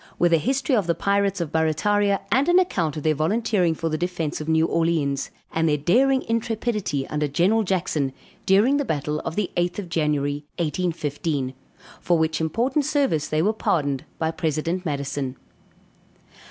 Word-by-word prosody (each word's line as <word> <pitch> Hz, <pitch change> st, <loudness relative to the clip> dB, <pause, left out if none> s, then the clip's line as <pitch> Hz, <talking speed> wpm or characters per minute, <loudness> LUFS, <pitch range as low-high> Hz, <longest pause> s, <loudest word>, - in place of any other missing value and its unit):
_With 175 Hz, -1 st, +3 dB
a -, -, +6 dB
History 265 Hz, -, 0 dB
of 205 Hz, -6 st, +1 dB
the 170 Hz, -, +2 dB
Pirates 200 Hz, -1 st, +1 dB
of 160 Hz, -3 st, -3 dB
Barrataria 195 Hz, +6 st, +1 dB
and 265 Hz, +8 st, +3 dB
an 350 Hz, -, +5 dB
account 175 Hz, -, +1 dB
of 150 Hz, -, -5 dB
their 155 Hz, -, +3 dB
volunteering 180 Hz, +2 st, +1 dB
for 165 Hz, -, -3 dB
the 155 Hz, -1 st, -2 dB
defence 170 Hz, -4 st, -2 dB
of 155 Hz, -, -5 dB
New 160 Hz, 0 st, +3 dB
Orleans; 160 Hz, -5 st, 0 dB, 0.2 s
and 165 Hz, 0 st, +1 dB
their 150 Hz, -, +2 dB
daring 260 Hz, -, +3 dB
intrepidity 220 Hz, -, -1 dB
under 150 Hz, 0 st, -1 dB
General 180 Hz, +10 st, +2 dB
Jackson, 180 Hz, -8 st, -1 dB, 0.4 s
during 215 Hz, +9 st, +4 dB
the 285 Hz, -, +1 dB
battle 150 Hz, -, -2 dB
of 160 Hz, -, -5 dB
the 205 Hz, -3 st, -1 dB
8th 175 Hz, 0 st, 0 dB
of 195 Hz, -4 st, -5 dB
January, 145 Hz, -3 st, 0 dB
1815. 150 Hz, -5 st, -2 dB, 0.5 s
For 175 Hz, -, +2 dB
which 160 Hz, 0 st, 0 dB
important 240 Hz, -, 0 dB
service 270 Hz, -, +1 dB
they 155 Hz, +1 st, 0 dB
were 215 Hz, +4 st, +2 dB
pardoned 145 Hz, -10 st, 0 dB
by 160 Hz, 0 st, 0 dB
President 165 Hz, +3 st, -2 dB
Madison. 140 Hz, -2 st, -3 dB
165 Hz, 165 wpm, -23 LUFS, 150-205 Hz, 0.5 s, a